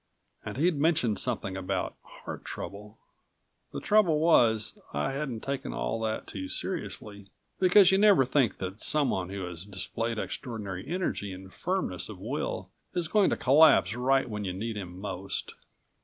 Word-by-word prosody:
And - - -6
he'd 165 +2 +2
mentioned 145 -9 +2
something 105 -6 -2
about 95 -1 -2 0.3
heart - - -6
trouble 105 +2 -8 0.7
The - - -4
trouble 205 -7 +4
was, 115 -10 +4 0.2
I 75 - 0
hadn't 135 -5 -3
taken 140 0 -3
all 115 - -2
that 110 -1 -2
too 95 -2 -6
seriously, 100 +1 -4 0.3
because 185 0 +7
you 190 - +4
never 200 -10 +6
think 130 -3 +2
that 95 +2 -6
someone 130 -12 +1
who 100 0 -5
has 85 -1 -6
displayed 110 +4 -3
extraordinary 105 -6 -5
energy 170 - -2
and 95 0 -10
firmness 180 - -2
of 105 - -8
will 95 -3 -4 0.2
is 170 -3 -1
going 210 -3 +4
to - - 0
collapse 135 - +6
right 135 +2 +2
when 105 -2 -4
you 95 -2 -3
need 110 +4 -4
him 90 -3 -7
most. 95 -1 -4
110 Hz, 155 wpm, -29 LUFS, 95-150 Hz, 0.7 s, because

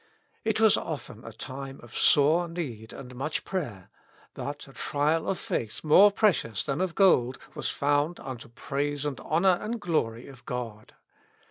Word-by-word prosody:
It 220 -1 +1
was 220 -2 +6
often 125 -7 -6
a 115 - -8
time 135 +4 -7
of 120 - -12
sore 160 +4 +4
need 130 -11 -5
and 125 -2 -9
much 145 +5 -2
prayer, 120 - -4 0.4
but 145 0 -6
a 135 - -14
trial 150 +4 0
of 195 - 0
faith 110 -7 -3
more 190 +7 +7
precious 185 - +1
than 140 +3 -2
of 185 -2 -1
gold 130 -11 +4 0.2
was - - -3
found 145 +4 +1
unto 125 -3 -7
praise 145 +4 -2
and 145 -3 -3
honor 175 +3 +3
and 230 +2 -3
glory 125 - -1
of 135 -4 -13
God. 115 -4 -5
145 Hz, 160 wpm, -28 LUFS, 125-170 Hz, 0.4 s, more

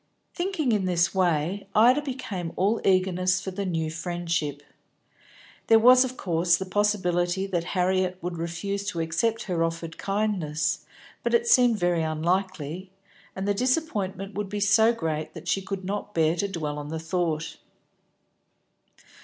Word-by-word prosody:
Thinking 345 -8 -1
in 205 -4 +1
this 175 -2 +1
way, 180 +1 0
Ida 245 +6 +6
became 220 - -5
all 205 +5 +1
eagerness 185 -1 +2
for 190 - -5
the 195 +1 -3
new 160 -3 -1
friendship. 165 -4 -3 1.0
There 225 - +7
was 250 +3 +7
of 255 0 -5
course 170 -1 +2
the 190 - -4
possibility 185 -2 +1
that 180 -4 -1
Harriet 185 0 +1
would 175 -1 -5
refuse 170 +4 -3
to 180 -5 -3
accept 165 +8 0
her 175 -4 -1
offered 165 0 -4
kindness, 185 -8 -1 0.3
but - - +1
it 470 0 +2
seemed 245 - +5
very 175 -3 +1
unlikely, 170 +1 -2 0.5
and 190 +1 -3
the 205 - +3
disappointment 205 - -1
would 205 -1 -4
be 205 +1 -3
so 215 +3 +5
great 160 -9 -3
that - - -9
she 195 - +1
could 195 -1 -5
not 205 +1 -4
bear 160 0 +3
to 200 +4 -1
dwell 150 -6 -4
on 145 - -6
the 160 - -3
thought. 165 -1 -2
185 Hz, 155 wpm, -26 LUFS, 165-205 Hz, 1.0 s, There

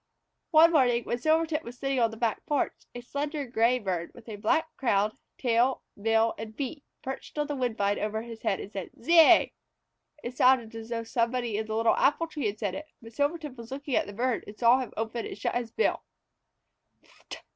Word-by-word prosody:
One 330 +1 +7
morning 245 -6 +3
when 240 - -2
Silvertip 315 +2 +2
was 245 -2 -10
sitting 275 0 -1
on 230 -1 +3
the 225 - -10
back 225 -2 -1
porch, 295 -2 +1 0.2
a 245 - -5
slender 290 +3 -3
gray 240 0 +2
bird, 185 -7 -3
with 240 - -14 0.2
black 320 +9 +1
crown, 210 -4 +1 0.2
tail, 245 +1 +1 0.2
bill, 225 +1 +3
and 220 0 -8
feet, 280 +2 -4 0.2
perched 265 +3 -7
on 295 - +1
the 290 0 -3
woodbine 220 -6 0
over 215 +1 -2
his 230 -1 -9
head 195 - 0
and 205 - -8
said, 195 -4 -5
"Zeay!" 330 +4 +6 0.7
It 245 +1 -5
sounded 250 -4 +4
as 225 0 -8
though 230 -1 -2
somebody 235 0 -1
in 215 +1 -2
the 220 - -3
little 225 0 +3
apple 295 +4 +2
tree 305 -7 -3
had 205 +1 -3
said 205 -4 -2
it, 305 +7 -6
but 230 0 -13
Silvertip 290 +1 -1
was 235 -2 -10
looking 280 +1 -5
at - - +1
the 205 - -8
bird 245 +3 -1
and 210 - -10
saw 240 +2 +5
him 255 - -4
open 225 +1 -3
and - - -8
shut - - -2
his 240 -2 -2
bill. 450 - +1
240 Hz, 200 wpm, -28 LUFS, 225-280 Hz, 0.7 s, One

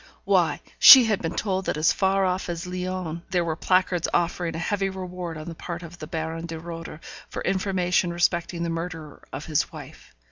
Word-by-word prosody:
Why, - - +2 0.2
she 260 -2 +11
had 220 -3 0
been 165 0 -3
told 190 -2 -1
that - - -1
as 155 +3 +3
far 195 0 +2
off 185 0 -1
as 170 +1 -4
Lyons 180 -2 -4
there 180 -2 +1
were 160 -1 -1
placards 185 0 +1
offering 170 -1 -1
a - - -3
heavy 195 +3 -1
reward 180 -3 -6
on 155 - -8
the 170 - -5
part 170 +1 -7
of 170 +1 -11
the 155 - -7
Baron 165 +1 -4
de 165 -1 -6
Roeder 165 -1 -8 0.3
for - - -5
information 185 -2 0
respecting 170 0 0
the 170 - -2
murderer 165 -2 -6
of 135 +3 -6
his 155 -1 0
wife. - - -12
175 Hz, 200 wpm, -25 LUFS, 165-185 Hz, 0.3 s, she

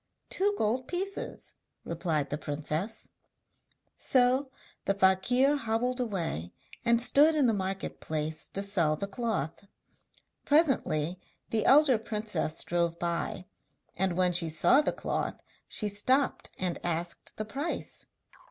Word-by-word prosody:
'Two 405 +2 +1
gold 240 +4 0
pieces,' 385 +3 -4 0.3
replied 160 -4 -1
the 145 - -1
princess. 155 +9 -3 0.9
So 260 +1 +3 0.4
the 195 - +1
fakir 200 +9 +3
hobbled 245 +1 -1
away, 170 - -3 0.3
and 235 -1 +4
stood 290 +6 +4
in 295 -3 +3
the 230 - +3
market 195 -1 -3
place 155 0 -2
to 195 - +3
sell 175 -6 +1
the 175 - -3
cloth. 200 - -3 0.8
Presently 185 - +2 0.3
the 220 -1 +1
elder 275 -4 +6
princess 210 -7 -2
drove 170 -1 0
by, 170 +1 -2 0.5
and 185 -2 0
when 180 -1 +3
she 170 -2 +3
saw 160 - +5
the 295 - 0
cloth - - -3 0.3
she 210 - +3
stopped 255 +7 +1
and 180 -2 -2
asked 170 0 -2
the 215 - -3
price. 280 +9 -4
200 Hz, 125 wpm, -29 LUFS, 170-250 Hz, 0.9 s, elder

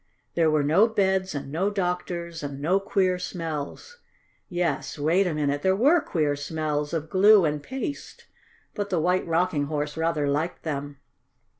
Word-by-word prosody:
There 165 -2 +3
were 155 -1 +2
no 170 +10 +4
beds 190 -5 0
and 140 -1 -5
no 180 +6 0
doctors 175 -3 -3
and 140 -1 -5
no 175 +7 +2
queer 190 -2 +1
smells. 170 - -5 0.5
Yes, 165 -7 -2
wait 170 +6 +2
a 170 - -1
minute, 145 -1 0
there 190 +3 +3
were 290 - +4
queer 150 - 0
smells 150 0 -2
of 160 -2 -2
glue 200 0 +6
and 150 -1 -1
paste, 265 - -6 0.5
but 205 -1 -3
the 180 - +1
White 180 +3 +1
Rocking 165 -3 +1
Horse 150 0 -3
rather 160 -3 0
liked 155 +5 -1
them. 145 -2 -4
165 Hz, 160 wpm, -25 LUFS, 150-190 Hz, 0.5 s, glue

